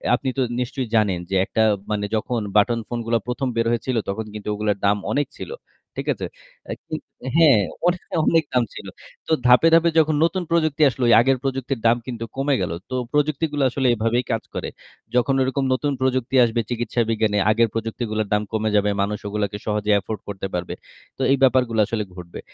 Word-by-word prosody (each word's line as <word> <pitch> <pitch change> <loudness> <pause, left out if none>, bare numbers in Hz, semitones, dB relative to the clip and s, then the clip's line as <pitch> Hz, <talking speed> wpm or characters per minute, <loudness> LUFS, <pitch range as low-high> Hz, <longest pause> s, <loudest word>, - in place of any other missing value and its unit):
আপনি 130 +2 -3
তো - - +2 0.2
নিশ্চয়ই 125 +1 -3
জানেন 105 -5 +2
যে 95 - -1
একটা 110 - -1 0.3
মানে 105 -1 -1
যখন 115 +2 -1 0.2
বাটন 115 +3 +3
ফোনগুলা 115 -1 -1
১ম 125 +2 -2
বের 115 0 +1
হয়েছিল 120 +2 -1
তখন 110 +3 -3
কিন্তু 105 -1 -8
ওগুলোর 105 -1 -1
দাম 100 +1 +3
অনেক 145 +3 0
ছিল, - - -7 0.5
ঠিক - - -4
আছে? - - -6 0.4
অ্যা - - -5
কিন 155 - -4 0.4
হ্যাঁ, 150 -9 +6 0.3
অনে 180 0 +2 0.3
অনেক 165 -1 +4
দাম 125 -1 +3
ছিল। - - -9 0.4
তো - - -4 0.2
ধাপে, 125 +6 +6
ধাপে 165 +1 +5
যখন 155 -1 +3
নতুন 180 +2 +1
প্রযুক্তি 155 -3 +1
আসলো, 130 0 -4
ওই - - +7
আগের 135 +2 +2
প্রযুক্তির 135 -1 -2
দাম 115 +1 +4
কিন্তু 115 -2 -4
কমে 135 +1 +1
গেল। - - -2 0.2
তো 130 - -3 0.2
প্রযুক্তিগুলো 150 0 0
আসলে 130 +1 0
এভাবেই 115 +3 0
কাজ 115 -1 -1
করে। - - -3 0.5
যখন 125 +2 +3
ওইরকম 135 +1 0
নতুন 145 +3 0
প্রযুক্তি 130 0 0
আসবে 115 0 0
চিকিৎসা 120 0 -1
বিজ্ঞানে, 110 -2 +1
আগের 115 +2 +3
প্রযুক্তিগুলার 110 -1 -3
দাম 105 0 +2
কমে 110 0 0
যাবে। 105 0 +3
মানুষ 105 +1 -1
ওগুলাকে 105 -1 -2
সহজে 105 -1 0
afford 105 +1 -5
করতে 95 -1 -4
পারবে। 90 -1 -3 0.4
তো - - -6
এই 140 - +4
ব্যাপারগুলা 125 -4 +3
আসলে 110 -2 -2
ঘটবে। 85 -1 -9
120 Hz, 190 wpm, -22 LUFS, 105-135 Hz, 0.5 s, ওই